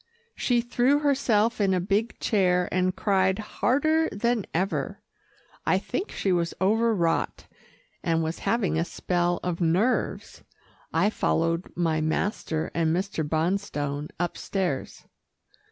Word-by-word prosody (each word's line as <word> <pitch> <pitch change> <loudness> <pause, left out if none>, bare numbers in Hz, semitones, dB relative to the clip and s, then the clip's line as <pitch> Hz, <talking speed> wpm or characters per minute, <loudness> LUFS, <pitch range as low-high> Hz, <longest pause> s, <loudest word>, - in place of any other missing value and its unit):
She 240 -2 +1
threw 245 +4 +2
herself 240 -7 +2
in 190 -2 +3
a - - +1
big 200 +5 -1
chair, 180 -4 +2
and 185 0 +1
cried 190 -2 +2
harder 310 +9 +1
than 235 0 0
ever. 190 +4 -1 0.6
I - - +3
think 390 - -3
she 195 - -1
was 170 -2 0
overwrought, 200 -4 +1 0.6
and 165 -1 +1
was 160 +1 -3
having 205 -8 0
a - - +2
spell 175 0 -1
of 180 -1 -2
nerves. 185 +10 0 0.5
I 205 - +2
followed 165 -3 0
my 165 -2 +1
master 160 0 -1
and 165 -1 +1
Mr. 185 -3 -2
Bonstone 155 -3 -1
upstairs. 175 -3 -3
185 Hz, 120 wpm, -26 LUFS, 165-220 Hz, 0.6 s, in